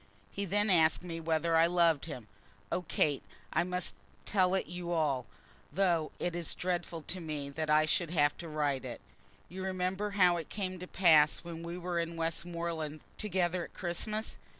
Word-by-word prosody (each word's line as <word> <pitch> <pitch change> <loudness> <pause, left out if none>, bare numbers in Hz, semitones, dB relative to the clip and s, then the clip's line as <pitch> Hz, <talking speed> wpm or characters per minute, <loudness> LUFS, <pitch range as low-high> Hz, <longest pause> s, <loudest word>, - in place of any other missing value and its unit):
He 200 - -3
then 205 +2 +2
asked 160 -1 +4
me 165 -2 -5
whether 165 0 +1
I 165 +1 +6
loved 170 -4 +3
him. 125 -9 -7 0.4
Oh, - - 0
Kate, 150 -4 +1 0.3
I - - +3
must 180 - -1 0.3
tell 185 -2 +3
it 190 - 0
you 175 0 -5
all, 145 -8 +1 0.4
though 175 -5 +2
it 175 -1 -2
is 170 -2 -2
dreadful 175 -2 -2
to 185 - -4
me 150 -4 -4
that 155 +2 -3
I 155 0 +5
should 170 +1 +1
have 145 -3 +3
to 170 - -6
write 145 -4 0
it. - - -6 0.5
You 185 +1 -6
remember 190 +2 -1
how 180 -2 +6
it 165 - -6
came 185 -3 -3
to 180 - -7
pass 160 -6 +5
when 170 -1 -7
we 170 +1 -5
were 175 -1 -2
in 170 0 -2
Westmoreland 165 -2 -3 0.2
together 180 -3 0
at - - -16
Christmas? 210 +5 -2
170 Hz, 180 wpm, -32 LUFS, 160-180 Hz, 0.5 s, I